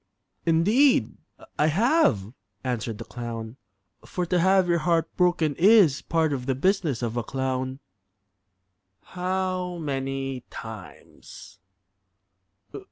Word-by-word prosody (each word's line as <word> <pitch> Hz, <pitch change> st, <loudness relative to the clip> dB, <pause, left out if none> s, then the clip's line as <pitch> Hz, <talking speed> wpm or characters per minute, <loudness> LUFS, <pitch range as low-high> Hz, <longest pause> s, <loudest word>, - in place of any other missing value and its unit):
"Indeed 210 Hz, -, +3 dB, 0.4 s
I 150 Hz, -, +4 dB
have," 160 Hz, -, +2 dB, 0.3 s
answered 115 Hz, -4 st, -3 dB
the -, -, -7 dB
clown. 115 Hz, -1 st, -7 dB, 0.5 s
"For 180 Hz, -, -3 dB
to 175 Hz, +1 st, +1 dB
have 190 Hz, +1 st, +4 dB
your 170 Hz, -1 st, +2 dB
heart 165 Hz, 0 st, 0 dB
broken 175 Hz, -4 st, +2 dB
is 190 Hz, -7 st, +5 dB
part 160 Hz, -2 st, 0 dB
of 125 Hz, -2 st, -4 dB
the 135 Hz, -, +1 dB
business 155 Hz, -, 0 dB
of 120 Hz, 0 st, -2 dB
a 120 Hz, -, -1 dB
clown." 130 Hz, +1 st, -3 dB, 1.3 s
"How 185 Hz, -1 st, -3 dB
many 135 Hz, -3 st, -3 dB
times?" 105 Hz, -2 st, -11 dB
155 Hz, 105 wpm, -25 LUFS, 125-180 Hz, 1.3 s, is